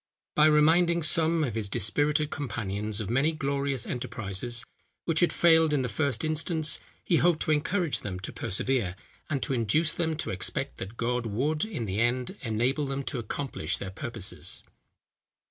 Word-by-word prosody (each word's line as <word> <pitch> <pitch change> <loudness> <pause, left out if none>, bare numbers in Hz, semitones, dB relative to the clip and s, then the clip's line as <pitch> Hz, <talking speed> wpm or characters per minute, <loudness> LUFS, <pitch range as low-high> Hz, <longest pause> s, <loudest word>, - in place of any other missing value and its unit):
By 155 0 +5
reminding 165 +3 +4
some 160 +1 +4
of 125 -7 -1
his 110 -2 -2
dispirited 145 - +1
companions 105 -6 -3
of 105 - -3
many 135 +8 +2
glorious 140 -4 -1
enterprises, 120 -1 -2 0.4
which 165 -2 +2
had 175 - +4
failed 160 -2 +4
in 140 -3 +2
the 125 - -2
first 125 0 0
instance, 155 0 +2 0.2
he 170 - +3
hoped 170 -2 +3
to - - 0
encourage 160 +2 +1
them 90 -3 -5
to 95 - -6
persevere, 100 -2 -1 0.3
and 140 -3 -1
to - - -1
induce 130 +7 +2
them 160 -2 -1
to - - -3
expect 95 0 -2
that 100 +5 -7
God 120 0 -1
would, 145 +9 0
in 200 - -4
the 100 +1 -2
end, 125 - 0
enable 125 +6 0
them 135 0 -3
to 130 - -3
accomplish 130 +5 -3
their 95 - -6
purposes. 110 0 -5
135 Hz, 165 wpm, -28 LUFS, 115-155 Hz, 0.4 s, By